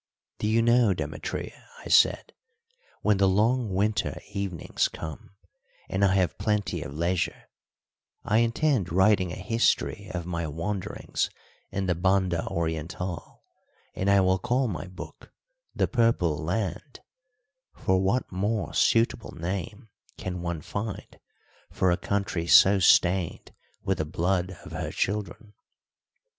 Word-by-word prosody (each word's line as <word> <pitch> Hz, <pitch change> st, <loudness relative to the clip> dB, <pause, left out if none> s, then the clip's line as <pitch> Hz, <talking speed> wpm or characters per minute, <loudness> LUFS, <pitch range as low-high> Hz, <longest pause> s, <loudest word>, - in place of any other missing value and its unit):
"Do 105 Hz, -, -1 dB
you 115 Hz, +1 st, +3 dB
know, 120 Hz, -4 st, +4 dB
Demetria," -, -, -5 dB, 0.2 s
I -, -, -6 dB
said, -, -, +4 dB, 0.7 s
"when 105 Hz, -1 st, +3 dB
the 100 Hz, 0 st, +4 dB
long 110 Hz, +4 st, +2 dB
winter 105 Hz, +3 st, 0 dB
evenings 95 Hz, -5 st, -1 dB
come, 80 Hz, +4 st, -9 dB, 0.5 s
and 95 Hz, +2 st, -1 dB
I 95 Hz, -1 st, +4 dB
have 90 Hz, -4 st, +1 dB
plenty 105 Hz, -5 st, -1 dB
of 75 Hz, -, -6 dB
leisure, 85 Hz, +2 st, -2 dB, 0.7 s
I 110 Hz, -, +2 dB
intend 115 Hz, -, +1 dB
writing 95 Hz, 0 st, +3 dB
a -, -, -5 dB
history 115 Hz, +5 st, 0 dB
of 85 Hz, -2 st, -4 dB
my 85 Hz, -2 st, -3 dB
wanderings 85 Hz, +6 st, -3 dB, 0.4 s
in 95 Hz, 0 st, -2 dB
the 90 Hz, -, +2 dB
Banda 95 Hz, -1 st, +1 dB
Oriental, 85 Hz, +2 st, -4 dB, 0.5 s
and 95 Hz, -, -1 dB
I 100 Hz, 0 st, +5 dB
will 95 Hz, 0 st, +2 dB
call 125 Hz, +5 st, +1 dB
my 95 Hz, -3 st, -5 dB
book 90 Hz, +1 st, -11 dB, 0.4 s
The -, -, +2 dB
Purple 115 Hz, -, +2 dB
Land; 90 Hz, -, -3 dB, 0.7 s
for 95 Hz, 0 st, +1 dB
what 100 Hz, +7 st, 0 dB
more 100 Hz, +3 st, -1 dB
suitable 115 Hz, -2 st, +2 dB
name 100 Hz, +6 st, -5 dB, 0.3 s
can 90 Hz, -1 st, -5 dB
one 85 Hz, -2 st, -3 dB
find 100 Hz, +6 st, -6 dB, 0.5 s
for 95 Hz, -, +2 dB
a -, -, +3 dB
country 100 Hz, -4 st, -2 dB
so 95 Hz, +3 st, +7 dB
stained 90 Hz, -1 st, +3 dB, 0.3 s
with 95 Hz, -2 st, -1 dB
the 80 Hz, -, 0 dB
blood 90 Hz, +3 st, -1 dB
of -, -, -10 dB
her -, -, -4 dB
children? 105 Hz, +1 st, -3 dB
95 Hz, 130 wpm, -27 LUFS, 90-105 Hz, 0.7 s, so